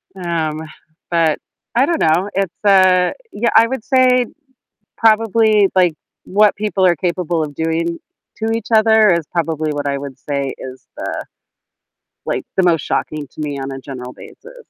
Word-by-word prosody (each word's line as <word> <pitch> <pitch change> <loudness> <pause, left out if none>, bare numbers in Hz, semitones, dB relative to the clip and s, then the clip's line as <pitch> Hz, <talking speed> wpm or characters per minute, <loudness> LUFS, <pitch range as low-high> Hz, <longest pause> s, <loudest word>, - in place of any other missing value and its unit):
Um, 165 -4 -2 0.5
but, 165 -3 +2 0.3
I 255 +3 +4
don't 335 0 -1
know. 170 +5 +2
It's, 195 0 -3
uh, 185 -2 +5 0.2
yeah, 235 +3 0
I 225 - +7
would 245 -2 -4
say 255 -2 +4 0.7
probably, 220 -2 +4
like, 180 -3 +4 0.3
what 210 +1 +3
people 205 -2 0
are 175 -1 +4
capable 175 -1 -1
of 145 -1 -6
doing 165 +2 -2 0.4
to 225 0 -2
each 225 -2 -5
other 220 -1 +5
is 170 -3 +2
probably 160 -2 -1
what 145 -1 -3
I 140 0 -1
would 140 -1 -8
say 140 -1 -3
is 130 0 -10
the, - - -5 1.0
like, - - -2
the 190 - +4
most 165 -4 +3
shocking 150 -1 -3
to - - -9
me 145 -2 -3
on 135 0 -5
a 135 - -6
general 125 -2 -8
basis. - - -14
175 Hz, 165 wpm, -18 LUFS, 155-215 Hz, 1.0 s, I